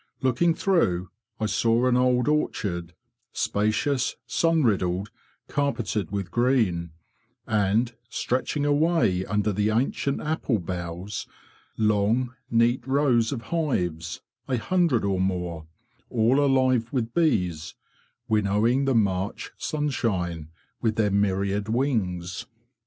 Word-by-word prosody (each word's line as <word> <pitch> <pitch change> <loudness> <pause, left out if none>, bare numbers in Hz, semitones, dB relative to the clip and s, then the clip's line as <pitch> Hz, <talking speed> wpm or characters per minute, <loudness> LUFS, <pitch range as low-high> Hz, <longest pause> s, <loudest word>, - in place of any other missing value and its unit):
Looking 145 +7 +2
through, 95 - +1 0.3
I 110 - 0
saw 115 +3 +2
an 125 -1 +3
old 125 -1 +2
orchard, 90 - -1 0.4
spacious, 110 +6 0
sun 165 -2 +2
riddled, 95 -2 0 0.4
carpeted 120 -8 -1
with 100 -4 -4
green; 115 -9 +1 0.6
and, 110 +2 +1 0.2
stretching 130 +3 -1
away 145 - +2
under 105 +2 0
the 105 +2 +1
ancient 130 +4 0
apple 150 -6 -1
boughs, 90 +2 -5 0.5
long, 110 +4 +1 0.2
neat 120 +2 +3
rows 130 -5 +2
of 120 -5 -4
hives, 90 - -1 0.3
a 130 - 0
hundred 165 - +1
or 95 -2 0
more, 90 -4 -2 0.4
all 125 +4 +3
alive 130 -4 +2
with 120 -4 -2
bees, 90 - 0 0.5
winnowing 110 +5 +2
the 135 -2 +2
March 100 -3 0
sunshine 95 - -2 0.3
with 110 -2 +1
their 105 -2 +1
myriad 100 +1 0
wings. 100 -9 -1
110 Hz, 110 wpm, -25 LUFS, 95-130 Hz, 0.6 s, an